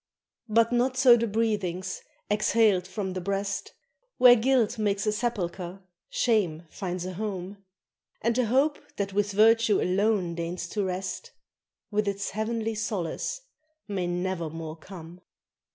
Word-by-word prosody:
But 230 +2 +4
not 250 +2 +1
so 250 -2 +8
the 235 0 0
breathings 200 -5 -1 0.3
exhaled 210 -3 +3
from 190 -1 -4
the 185 - -4
breast 200 - -3 0.4
Where 250 -1 +9
guilt 240 -1 +2
makes 200 -1 0
a 215 - +2
sepulchre, 195 -5 -3 0.3
shame 190 -9 +1
finds 180 -2 -4
a 185 - -4
home; 195 0 -5 0.6
And 230 +1 +2
the 250 -1 +2
hope 275 +6 +2 0.2
that 200 -1 -3
with 205 0 +1
virtue 220 +1 +4
alone 190 -1 +1
deigns 170 +1 -4
to 205 +1 -1
rest, 185 0 -4 0.6
With 210 0 0
its 200 0 -2
heavenly 225 +2 -2
solace 210 - -3 0.5
may 190 -4 -2
never 175 -1 -2
more 160 0 -6
come. 170 0 -11
200 Hz, 135 wpm, -27 LUFS, 185-225 Hz, 0.6 s, Where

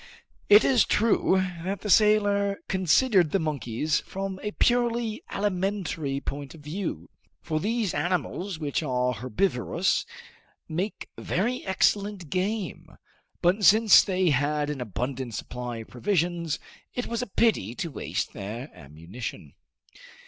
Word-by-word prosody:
It 210 +2 +8
is 255 -4 +5
true 190 -4 +2 0.2
that 195 +2 -3
the 210 - -4
sailor 205 -1 +4
considered 190 - +3
the 195 - +2
monkeys 150 -2 -1
from 195 0 -5
a 210 - -2
purely 235 -1 +1
alimentary 185 -7 -1
point 140 +1 -6
of 160 - -14
view, 150 - -5 0.3
for 155 -1 -1
those 220 +1 -1
animals 180 +1 -2
which 150 -2 -2
are 125 -4 0
herbivorous 125 - 0 0.6
make 180 +6 -3
very 240 +8 -1
excellent 195 -3 0
game; 190 -1 -3 0.5
but 185 +4 +3
since 215 +1 +8
they 185 -3 +1
had 145 +2 +1
an 140 -3 -5
abundant 125 +2 -4
supply 125 +1 -5
of 115 - -9
provisions, 170 - -1 0.4
it 245 - -2
was 235 0 -2
a 250 - -3
pity 190 - +1
to 165 - -4
waste 125 - -3
their 115 +8 -6
ammunition. 80 - -8
180 Hz, 125 wpm, -26 LUFS, 135-205 Hz, 0.6 s, It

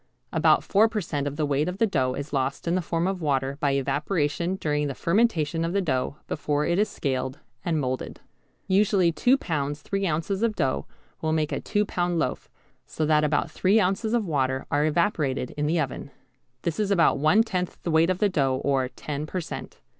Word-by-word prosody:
About - - +4
four 215 +3 +4
per 220 -1 -2
cent. 145 -6 -2
of 145 - -4
the 155 0 0
weight 145 +3 +1
of 180 - -5
the 225 - +3
dough 130 -10 0
is 140 +2 -6
lost 135 +3 -1
in 170 - +2
the 185 - +1
form 165 0 -1
of 190 -1 -2
water 135 -2 0
by 145 -2 +1
evaporation 150 +5 0
during 150 -4 -1
the 135 - -4
fermentation 170 -5 +1
of 165 +1 -1
the 200 - +2
dough 140 -4 -1
before 150 0 -1
it 170 +2 +1
is 210 - +2
scaled 130 -1 -2 0.3
and 165 -3 0
moulded. 130 -2 -3 0.5
Usually 195 -2 +3
2 250 - +3
lb. 145 - -2
3 195 +6 -2
oz. 165 +3 -1
of 230 -2 +1
dough 100 - -1 0.3
will 160 0 0
make 155 -1 0
a - - -1
two 210 0 0
pound 175 -2 -1
loaf, - - -2 0.4
so 155 - -2
that 150 0 +3
about 150 +1 +1
three 195 +7 +3
ounces 210 +4 +1
of 230 -3 +1
water 130 -5 0
are 145 +1 +2
evaporated 155 -6 0
in 150 0 -2
the 165 +2 +1
oven, 140 -1 -3 0.5
This 170 +1 -2
is 210 -2 +1
about 170 -7 +3
one 155 +10 +5
tenth 180 -5 -3
the 170 - -1
weight 160 +2 +4
of 185 - +1
the 210 - +3
dough 135 -8 +1
or 135 -2 +2
10 150 +2 -5
per 185 - -3
cent. 170 - -7
155 Hz, 210 wpm, -26 LUFS, 145-185 Hz, 0.5 s, one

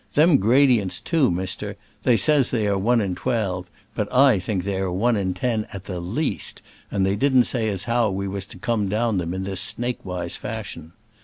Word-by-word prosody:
Them 155 +1 +6
gra 125 +8 +4
dients, 110 -8 +2
too, 160 -6 +2
mister, 95 +3 -3 0.2
they 120 0 +3
says 145 -3 +3
they 110 -4 0
are 100 -1 +1
one 115 +5 +2
in 95 -3 -1
twelve, 95 -6 -2 0.2
but 105 -1 -3
I 130 -5 +5
think 95 -1 -2
they 100 0 -2
are 95 -1 -1
one 115 +6 +1
in 95 -3 -1
ten, 110 +2 -1
at 95 -2 -8
the 90 -3 -5
least, 115 - -3 0.3
and 95 -2 0
they 95 +1 +1
didn't 130 +1 +4
say 115 -3 -1
as 95 -3 -1
how 120 -2 +1
we 100 0 -3
was 95 0 -4
to - - -11
come 110 -5 -1
down 110 -1 0
them 85 -1 -3
in 95 - -3
that 95 0 -4
snakewise 95 -7 -2
fashion. 100 -7 -7
105 Hz, 210 wpm, -23 LUFS, 95-120 Hz, 0.3 s, Them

